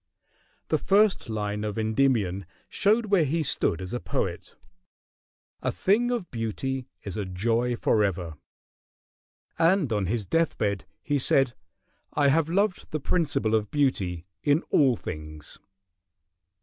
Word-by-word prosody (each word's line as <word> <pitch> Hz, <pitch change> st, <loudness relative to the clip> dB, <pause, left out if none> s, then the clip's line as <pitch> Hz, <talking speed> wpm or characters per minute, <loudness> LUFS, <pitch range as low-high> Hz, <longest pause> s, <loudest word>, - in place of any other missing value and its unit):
The -, -, +2 dB
first 200 Hz, -, +3 dB
line 105 Hz, -1 st, -2 dB
of 105 Hz, -1 st, -3 dB
"Endymion" 110 Hz, -5 st, +1 dB, 0.2 s
showed 220 Hz, +3 st, +2 dB
where 195 Hz, -5 st, +3 dB
he 155 Hz, +3 st, 0 dB
stood 100 Hz, -, 0 dB
as 90 Hz, -, -6 dB
a 120 Hz, -, -1 dB
poet, -, -, -3 dB, 1.1 s
"A -, -, 0 dB
thing 210 Hz, -, +2 dB
of 235 Hz, -7 st, -3 dB
beauty 125 Hz, +3 st, -3 dB, 0.2 s
is 100 Hz, -1 st, -5 dB
a 105 Hz, -, -1 dB
joy 115 Hz, +6 st, 0 dB
forever," 95 Hz, -8 st, 0 dB, 1.3 s
and 165 Hz, -, +3 dB
on 100 Hz, -3 st, 0 dB
his 110 Hz, +1 st, -1 dB
deathbed 105 Hz, -, 0 dB, 0.2 s
he 145 Hz, -2 st, 0 dB
said, 130 Hz, -1 st, +3 dB, 0.6 s
"I 145 Hz, -1 st, +3 dB
have 160 Hz, +2 st, +2 dB
loved 195 Hz, +2 st, 0 dB
the 155 Hz, -, -2 dB
principle 140 Hz, -8 st, 0 dB
of 105 Hz, -2 st, +1 dB
beauty 95 Hz, -, 0 dB, 0.2 s
in 145 Hz, +2 st, +2 dB
all 135 Hz, -5 st, +4 dB
things." 75 Hz, -5 st, -8 dB
120 Hz, 130 wpm, -26 LUFS, 105-160 Hz, 1.3 s, all